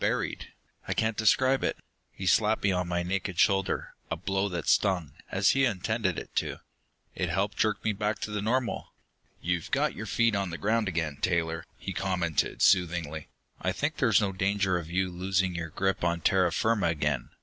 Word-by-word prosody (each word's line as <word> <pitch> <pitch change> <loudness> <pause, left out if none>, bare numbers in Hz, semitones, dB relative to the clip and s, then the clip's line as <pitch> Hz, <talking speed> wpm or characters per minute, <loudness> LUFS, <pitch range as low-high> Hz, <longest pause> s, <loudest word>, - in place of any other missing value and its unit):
buried.... - - -1 0.4
I - - -1
can't 110 0 +1
describe 130 +5 +3
it...." - - 0 0.3
He 95 - -7
slapped 110 +3 +3
me 100 - +3
on 90 -1 0
my 85 0 -1
naked 95 0 -2
shoulder, 95 -1 +2 0.2
a - - -1
blow 95 +3 -1
that 85 -3 -4
stung, 90 -7 +2 0.2
as 95 +1 +3
he 135 - +2
had 120 -6 +3
intended 100 0 -1
it - - -8
to. - - 0 0.6
It - - -2
helped 100 +2 0
jerk 110 -1 0
me 110 - +1
back 105 +1 -1
to 105 - -3
the 105 -1 -2
normal. 120 +3 -1 0.5
"You've 85 -1 -1
got - - +1
your - - -6
feet 115 -1 +2
on 100 -2 -1
the 85 - -5
ground 110 +2 +1
again, 80 -5 -2
Taylor," 80 -2 0
he 95 - -5
commented 90 -3 0
soothingly. 85 -4 +2 0.3
"I - - +1
think 150 +1 -2
there's 115 -5 +4
no 100 -2 0
danger 95 -1 +1
of 80 -2 -8
you 95 +1 0
losing 90 +1 0
your 85 -1 -4
grip 95 +4 -1
on 85 -1 +1
terra 90 -1 +3
firma 110 +2 +1
again. 75 -6 -1
95 Hz, 195 wpm, -28 LUFS, 85-105 Hz, 0.6 s, there's